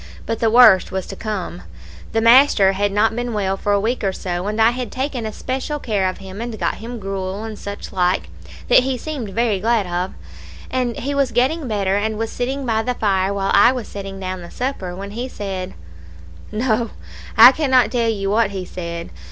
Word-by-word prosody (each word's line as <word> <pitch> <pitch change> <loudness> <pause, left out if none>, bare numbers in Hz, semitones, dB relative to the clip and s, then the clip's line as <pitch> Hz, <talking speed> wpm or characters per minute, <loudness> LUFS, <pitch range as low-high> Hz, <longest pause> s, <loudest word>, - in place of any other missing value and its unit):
But 225 - -2
the 225 - +2
worst 225 -5 +6
was 190 -1 -3
to - - -8
come. 205 - -5 0.5
"The 225 - +1
master 230 -4 +6
had 200 +1 0
not 220 +2 +2
been 240 -1 -3
well 195 -2 0
for 205 +1 -2
a 200 - +3
week 230 +4 -1
or 195 - +1
so, 180 0 -4
and 215 +1 -2
I 225 +1 +5
had 245 -3 -5
taken 260 -3 -3
especial 260 +6 -3
care 205 -9 0
of 185 - -6
him, 195 +2 -9
and 235 -2 -5
got - - -1
him 235 +2 -7
gruel 195 0 -4
and 220 -2 -7
such 200 0 -7
like, 180 - +1 0.4
that - - +7
he 260 0 -1
seemed 270 -5 -5
very 220 -1 0
glad 225 0 +1
of; 180 +1 -3 0.6
and 250 -2 -1
he 280 +3 -3
was 275 -2 +1
getting 265 +6 +1
better, 200 -3 0
and 215 +1 -1
was 225 0 -3
sitting 265 +3 -3
by 220 -2 +1
the 250 +2 -2
fire 195 -3 +1
while 195 -1 -1
I 200 +4 +7
was 250 -4 -5
setting 195 -1 -7
down 185 -1 -4
the 170 - -10
supper, 245 -9 -4
when 200 +2 -7
he 240 +4 -4
said 190 - -5 0.8
No, 225 +1 0 0.5
I - - +11
cannot 260 -7 +2
tell 235 -2 +1
you 200 -3 -1
what 220 -1 +3
he 190 -2 -5
said. 170 -2 -6
215 Hz, 210 wpm, -20 LUFS, 195-245 Hz, 0.8 s, I